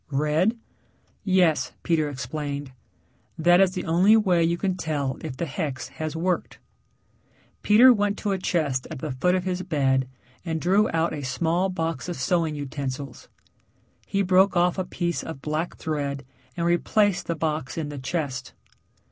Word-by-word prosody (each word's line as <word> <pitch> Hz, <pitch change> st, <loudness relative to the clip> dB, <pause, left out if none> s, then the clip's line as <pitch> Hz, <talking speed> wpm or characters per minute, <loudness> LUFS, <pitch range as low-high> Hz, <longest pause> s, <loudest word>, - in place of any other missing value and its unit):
"Red?" 155 Hz, -, +1 dB, 0.7 s
"Yes," 185 Hz, -5 st, +2 dB
Peter 155 Hz, -3 st, +1 dB
explained, 140 Hz, +1 st, -5 dB, 0.7 s
"That 175 Hz, +3 st, +5 dB
is 190 Hz, -1 st, +3 dB
the 185 Hz, -, -4 dB
only 185 Hz, +7 st, +5 dB
way 185 Hz, -6 st, +3 dB
you 170 Hz, +1 st, +1 dB
can 190 Hz, 0 st, -1 dB
tell 145 Hz, -6 st, -2 dB
if 145 Hz, -5 st, -6 dB
the 170 Hz, -, -2 dB
hex 140 Hz, -4 st, -4 dB
has 155 Hz, -1 st, -5 dB
worked." 180 Hz, +2 st, -1 dB, 1.0 s
Peter 240 Hz, +5 st, +7 dB
went 205 Hz, -2 st, 0 dB
to 205 Hz, -, -2 dB
a 190 Hz, -, -1 dB
chest 150 Hz, -8 st, -1 dB
at 160 Hz, -, -6 dB
the 145 Hz, +3 st, -4 dB
foot 160 Hz, +9 st, +1 dB
of 185 Hz, -, -1 dB
his 185 Hz, -1 st, -2 dB
bed 135 Hz, -7 st, +1 dB, 0.4 s
and 160 Hz, -2 st, -2 dB
drew 195 Hz, +6 st, +3 dB
out 165 Hz, +1 st, 0 dB
a 150 Hz, -, -4 dB
small 165 Hz, +8 st, 0 dB
box 165 Hz, -1 st, -3 dB
of 175 Hz, -, -3 dB
sewing 160 Hz, +3 st, 0 dB
utensils. 140 Hz, -2 st, -5 dB, 0.8 s
He 200 Hz, 0 st, 0 dB
broke 185 Hz, 0 st, +4 dB
off 175 Hz, +2 st, +2 dB
a 185 Hz, -, -1 dB
piece 175 Hz, -2 st, -2 dB
of 160 Hz, -4 st, -7 dB
black 155 Hz, +3 st, -2 dB
thread 140 Hz, -3 st, -3 dB, 0.3 s
and 170 Hz, -, 0 dB
replaced 190 Hz, +3 st, +2 dB
the 170 Hz, -, -1 dB
box 155 Hz, -4 st, -2 dB
in 155 Hz, -3 st, -3 dB
the 145 Hz, -1 st, -6 dB
chest. 135 Hz, -2 st, -3 dB
165 Hz, 165 wpm, -25 LUFS, 145-180 Hz, 1.0 s, Peter